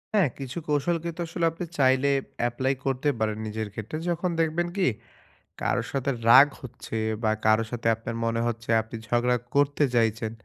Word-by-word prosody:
হ্যাঁ, 185 -10 +4
কিছু 135 +2 -6
কৌশল 150 +3 +1
কিন্তু 170 0 -5
আসলে 170 +1 -1
আপনি 165 +2 -6
চাইলে 130 0 +4 0.4
এপ্লাই 130 +3 0
করতে 135 +2 0
পারেন 110 -1 0
নিজের 110 0 -3
ক্ষেত্রে। 110 +8 -5
যখন 175 +1 0
দেখবেন 165 +2 +1
কি? 190 - +3 0.7
কারো - - 0
সাথে 140 0 -1 0.2
রাগ 135 +4 +9
হচ্ছে 125 -2 -8 0.3
বা 110 - +3
কারো 110 +1 +4
সাথে 120 -1 -3
আপনার 115 +1 -6
মনে 115 0 0
হচ্ছে 115 0 -5
আপনি 110 +1 -10
ঝগড়া 120 +1 +2 0.2
করতে 145 +1 +3
চাইছেন 110 -1 +1
130 Hz, 165 wpm, -26 LUFS, 115-150 Hz, 0.7 s, রাগ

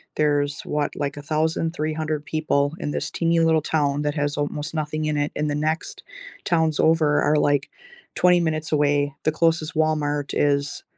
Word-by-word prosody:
there's, 145 -1 +1
what? 150 -1 -2
Like, 145 0 -3
1,300 155 0 -1
people 150 -2 0
in 145 - -3
this - - -3
teeny, 165 0 +1
little 160 -1 +3
town 145 -2 0
that 145 - 0
has 145 -1 -1
almost 150 +2 -3
nothing 155 0 -2
in 150 -1 0
it, 145 0 -1
and 150 0 -1
the 145 - -1
next 155 +2 -2 0.4
towns 160 -3 +1
over 160 -2 +3
are, 150 - +2
like, 145 -2 +1 0.5
20 180 -1 +4
minutes 160 -2 -2
away. 145 -1 +1
The 155 - +2
closest 160 0 +1
Walmart 150 -2 0
is 145 0 0
150 Hz, 165 wpm, -23 LUFS, 145-160 Hz, 0.5 s, 20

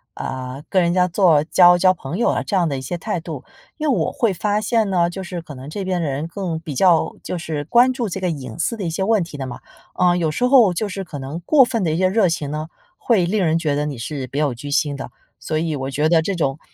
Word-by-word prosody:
呃， 130 +1 -5
跟 185 -2 +3
人 170 0 +1
家 180 0 +3
做 170 -4 +4
交 175 +1 +6
交 185 +1 +4
朋 165 -1 -6
友 235 - +1
啊 - - 0
这 200 - 0
样 175 -2 +2
的 140 -3 -2
一 - - -5
些 155 +7 -4
态 170 0 -3
度。 160 -5 -7 0.3
因 310 -1 -2
为 265 - +3
我 - - 0
会 225 -5 0
发 205 +3 0
现 220 -1 +1
呢， 175 -2 +2
就 190 +2 -6
是 180 -2 -6
可 155 -3 -10
能 130 +2 -9
这 195 +4 -5
边 185 -2 -1
的 160 - -1
人 140 +4 -3
更 170 -2 -4
比 160 -4 -7
较 175 +3 +3
就 180 - -4
是 160 -3 -4
关 245 - +4
注 240 -4 -2
这 190 - -4
个 185 -1 -1
隐 130 -8 -6
私 230 - 0
的 215 - -6
一 170 - -1
些 165 +4 -3
问 215 -3 +2
题 165 -3 -9
的 135 -2 -4
嘛。 120 - -8 0.4
呃， 180 -1 +3
有 165 -3 0
时 150 - -3
候 250 -7 +5
就 205 +4 -2
是 195 0 -5
可 150 -4 -7
能 135 +5 -6
过 295 -4 +6
分 230 -5 -1
的 160 - +1
一 - - -1
些 185 +1 +2
热 200 0 +3
情 155 -4 -2
呢， 155 +1 -4 0.3
会 210 -8 +2
令 190 +1 0
人 160 0 +2
觉 155 -4 0
得 145 +1 -1
你 145 -3 -4
是 130 +3 -5
别 140 +4 -2
有 145 -4 +1
居 130 +5 -8
心 145 0 0
的。 135 - -7 0.3
所 155 - -3
以 160 0 -1
我 135 0 -4
觉 150 +3 +1
得 165 -1 +4
这 195 +4 -2
种， 145 -4 -1
170 Hz, 305 characters per minute, -20 LUFS, 150-190 Hz, 0.4 s, 交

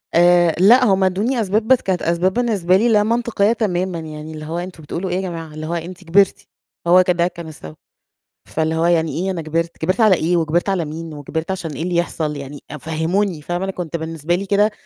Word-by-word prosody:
آآ 175 -1 +5
لأ، 240 +7 +6
هُم 195 -3 +3
ادّوني 210 +7 +1
أسباب، 215 +2 0
بس 260 - +6
كانت 185 -2 -1
أسباب 170 +3 +1
بالنسبة 200 -7 +2
لي 230 +4 +2
لا 210 -2 +4
منطقية 230 -1 +1
تمامًا، 185 -6 -1
يعني 155 0 -8
اللي 155 0 -8
هو 165 +2 -4
"أنتم 175 -2 -8
بتقولوا 175 +5 -4
إيه 180 - -1
يا 185 - 0
جماعة؟" 165 -4 -6
اللي 155 0 -6
هو 170 - -3
"أنتِ 175 +2 -6
كبرتِ." 190 +3 +2 0.4
هو 180 +2 +6
ك 180 - +1
ده 175 -1 +2
كان 170 -2 -8
السبب. 80 - -10 0.7
فاللي 160 0 -1
هو 165 +1 +1
"يعني 165 -1 +1
إيه 190 +1 -1
أنا 175 -3 -3
كبرت؟ 165 +2 -2
كبرت 185 +6 -1
على 215 -4 +6
إيه، 175 +1 +1
وكبرت 170 +3 0
على 185 -4 0
مين، 160 +1 -7
وكبرت 160 +4 -4
عشان 180 -4 -4
إيه 150 +2 -5
اللي 175 0 -2
يحصل 160 -3 -1
يعني؟ 140 0 -8
أ 150 - -6
فهموني." 160 +4 -1
فاهمة؟ 175 +4 -3
أنا 195 - -2
كنت 175 -4 -5
بالنسبة 165 +1 -2
لي 195 +3 -3
كده 205 +2 +2
175 Hz, 225 wpm, -19 LUFS, 160-190 Hz, 0.7 s, لأ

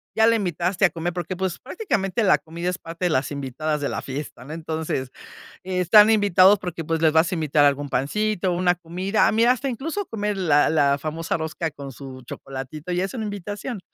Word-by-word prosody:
ya 220 0 +5
la 230 - +4
invitaste 180 -1 0
a - - +4
comer, 170 +1 -4
porque, 175 +1 -4
pues, 190 -2 -2
prácticamente 230 - -2
la 190 - +5
comida 170 +2 -5
es 180 - -3
parte 165 +1 -6
de - - +3
las 135 -2 0
invitadas 145 +2 -3
de 140 - -1
la - - -3
fiesta, 135 -1 -6
¿no? 150 - -8
Entonces, 160 -5 -3 0.5
están 185 +3 +5
invitados 200 -2 +5
porque, 175 -3 -5
pues, 165 +1 -1
les 160 -2 +4
vas 160 +2 +3
a - - -1
invitar 150 -3 +2
algún 145 0 +1
pancito, 185 +8 0
una 175 0 +2
comida. 180 +5 0
A - - +2
mí, 225 +1 +3
hasta 255 +3 +2
incluso 320 - -3
comer 210 -2 -3
la 150 -6 +3
la 145 -3 +3
famosa 160 +2 -3
rosca 160 0 -3
con 140 -2 -9
su 130 0 -10
chocolatito, 135 +7 -7
ya 180 +1 0
es 195 - -4
una 225 -4 -4
invitación. 205 +2 -5
175 Hz, 205 wpm, -23 LUFS, 155-200 Hz, 0.5 s, ya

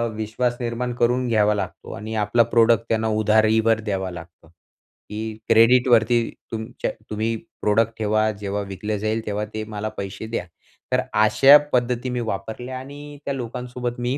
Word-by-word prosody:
विश्वास 110 +3 -1
निर्माण 120 +1 -2
करून 125 +1 +2
घ्यावा 105 -2 +3
लागतो 105 - -5
आणि 110 +3 -6
आपला 105 +2 +3
प्रॉडक्ट 115 -1 +3
त्यांना 110 0 +1
उधारीवर 110 +1 +3
द्यावा 95 -4 -3
लागतो. 85 -1 -12 0.6
की 110 +1 -5
क्रेडिटवरती 120 +1 +5 0.3
तुमच्या 110 +1 -4 0.2
तुम्ही 110 +2 -1 0.3
प्रॉडक्ट 110 +2 +2
ठेवा, 110 0 +1
जेव्हा 100 0 -4
विकलं 105 +2 -3
जाईल 110 +2 -2
तेव्हा 105 0 -2
ते 110 - -3
मला 110 0 -4
पैसे 100 +2 -5
द्या. 115 -5 -3 0.5
तर - - +3
अशा 110 +7 +7 0.2
पद्धती 125 0 0
मी 125 - -2
वापरल्या 110 +5 -5
आणि 145 +2 -10
त्या 140 - -1
लोकांसोबत 125 0 -5
मी 125 +3 -1
110 Hz, 150 wpm, -23 LUFS, 105-120 Hz, 0.6 s, अशा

